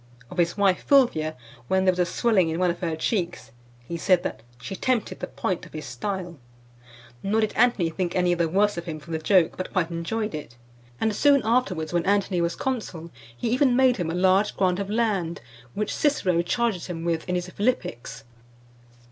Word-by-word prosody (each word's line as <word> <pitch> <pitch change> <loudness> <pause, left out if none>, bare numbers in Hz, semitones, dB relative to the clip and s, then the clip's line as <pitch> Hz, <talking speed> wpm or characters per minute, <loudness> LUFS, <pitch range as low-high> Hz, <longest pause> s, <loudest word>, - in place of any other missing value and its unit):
Of 180 - -5
his 170 +2 +1
wife, 195 -2 +3
Fulvia, 195 - +3 0.3
when 190 +4 +2
there 185 - +6
was 180 - -6
a 175 - +3
swelling 200 -8 +2
in 160 - -2
one 180 -1 +3
of 175 - -7
her 165 -3 -2
cheeks, 170 - -2 0.4
he 170 - -4
said 180 +1 +3
that 110 - -4 0.2
"she 195 - -6
tempted 245 +2 -1
the - - -4
point 185 -2 -3
of - - -20
his 155 -2 -6
style;" 175 +6 -5 0.8
nor 215 +3 +1
did 215 - 0
Antony 220 -8 +2
think 175 +1 -2
any 180 -1 +3
the 170 -2 0
worse 205 +2 +2
of 170 - -8
him 160 -3 -5
for 165 +3 -12
the 160 - -1
joke, 175 +1 +3
but 185 - -5
quite 175 -3 0
enjoyed 210 +6 -3
it; 145 -6 -7 0.4
and 220 -2 0
soon 280 0 +4
afterwards, 195 -9 0
when 175 -1 +2
Antony 200 -3 +2
was 170 0 0
consul, 190 -11 -4 0.3
he 225 - -2
even 255 0 +3
made 255 -1 +4
him 175 -4 -2
a 165 - -2
large 190 +3 +3
grant 185 -1 +2
of 200 0 -3
land, 205 -7 0 0.4
which 210 +1 -2
Cicero 190 - +2
charges 215 0 -1
him 170 -2 -5
with 165 +1 -1
in 180 - +1
his 180 0 -2
Philippics. 135 - -2
185 Hz, 200 wpm, -25 LUFS, 170-215 Hz, 0.8 s, there